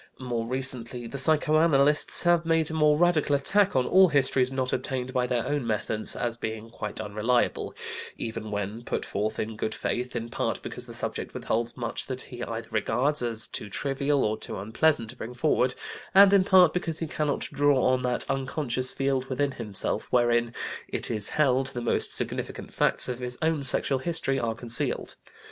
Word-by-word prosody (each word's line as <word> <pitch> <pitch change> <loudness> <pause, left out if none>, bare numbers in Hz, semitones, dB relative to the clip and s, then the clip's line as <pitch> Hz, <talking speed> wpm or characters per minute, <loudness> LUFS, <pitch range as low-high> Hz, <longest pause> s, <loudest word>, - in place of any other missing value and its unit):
More 120 -3 -3
recently 125 -1 -3
the 135 +4 -5
psychoanalysts 150 0 +3
have 175 -1 +3
made 165 -1 +1
a - - -5
more 150 -1 +3
radical 160 -4 +3
attack 200 +8 +3
on 130 -1 +3
all 190 0 +6
histories 135 -3 +2
not 130 -1 -2
obtained 130 0 -3
by 125 -1 +1
their 120 -2 -1
own 145 -5 -2
methods 110 0 0
as 120 -1 -2
being 110 -1 -6
quite 105 -2 -6
unreliable, 110 +4 -1 0.4
even 115 -1 -5
when 105 +2 -4
put - - -3
forth 105 +2 -2
in 110 0 -3
good 110 +1 -3
faith, 125 +1 -3
in 115 0 -3
part - - -2
because - - -5
the - - -7
subject - - -4
withholds 115 +1 -2
much 115 -2 -4
that 130 -1 -3
he 120 -2 -10
either 115 -1 -5
regards 125 +7 +1
as 115 -2 0
too 105 - -6
trivial 140 +4 0
or 110 0 -1
too - - -6
unpleasant 115 +4 +1
to - - -15
bring 125 0 -8
forward, 125 -2 +1 0.4
and 200 0 +8
in 195 -2 +6
part 185 -4 +6
because 165 -3 -2
he 165 - -2
cannot 150 -2 -2
draw 145 -2 +3
on 130 0 +2
that 125 -1 +2
unconscious 130 -2 -1
field 135 -1 -1
within 140 +2 -1
himself 105 -6 -2
wherein, 120 -1 +2 0.4
it - - -3
is 105 -2 -1
held, 135 -3 +2
the 135 -2 -5
most 120 - 0
significant - - -4
facts - - +3
in 125 - -3
his 125 0 -4
own 160 -2 +1
sexual 135 0 +2
history 135 -3 -1
are 115 -2 -2
concealed. 115 0 -1
130 Hz, 185 wpm, -27 LUFS, 115-145 Hz, 0.4 s, and